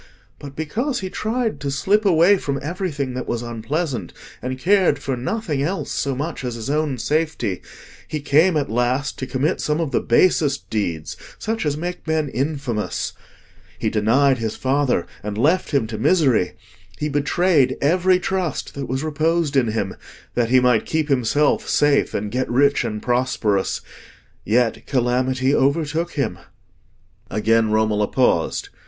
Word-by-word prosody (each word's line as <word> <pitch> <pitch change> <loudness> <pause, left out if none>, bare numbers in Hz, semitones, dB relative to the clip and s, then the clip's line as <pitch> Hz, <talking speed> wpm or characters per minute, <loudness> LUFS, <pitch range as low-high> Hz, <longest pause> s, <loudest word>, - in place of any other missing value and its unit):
But 140 -1 -9
because 235 - -2
he 185 -1 -5
tried 225 +1 -2
to 140 - -3
slip 200 +10 +1
away 180 +2 +5
from 140 -1 -2
everything 150 -5 -3
that 125 0 -5
was 120 0 -2
unpleasant, 120 - -3 0.3
and 130 +1 -3
cared 185 0 +3
for 135 -1 -3
nothing 145 - -2
else 180 +7 -2
so 140 -1 -1
much 150 +2 -4
as 125 -2 -3
his 115 +4 -4
own 150 -3 0
safety, 150 - -1 0.5
he 155 - -3
came 155 +4 +3
at 145 - 0
last 125 +5 0
to 130 - -4
commit 135 +7 0
some 150 +1 0
of 160 -5 -1
the - - +2
basest 140 +1 +2
deeds—such 105 - -3
as 145 0 -1
make 175 +1 -5
men 160 -2 0
infamous. 135 -5 -2 0.6
He - - -1
denied 130 +5 +3
his 110 -1 -2
father, 130 -8 +1 0.2
and 105 0 -5
left 160 +10 +2
him 140 -6 +1
to 110 -1 -6
misery; 135 - +3 0.4
he 150 - -2
betrayed 145 -1 +2
every 180 +5 +3
trust 185 -5 -2
that 140 -2 -5
was 130 +4 -2
reposed 155 0 0
in 130 -3 +3
him, 105 -4 -2 0.4
that 120 -2 +1
he 130 +1 +6
might 125 -3 +2
keep 155 -1 -1
himself 140 +3 +2
safe 145 -1 +2
and 105 0 -2
get 130 +2 -1
rich 140 +3 +3
and 105 -2 -4
prosperous. 120 -5 0 0.6
Yet 115 +1 +1
calamity 130 +1 +1
overtook 155 +5 +1
him." 135 - -2 0.9
Again 110 +1 +2
Romola 105 -1 +2
paused. 125 -10 +1
140 Hz, 155 wpm, -21 LUFS, 120-160 Hz, 0.9 s, he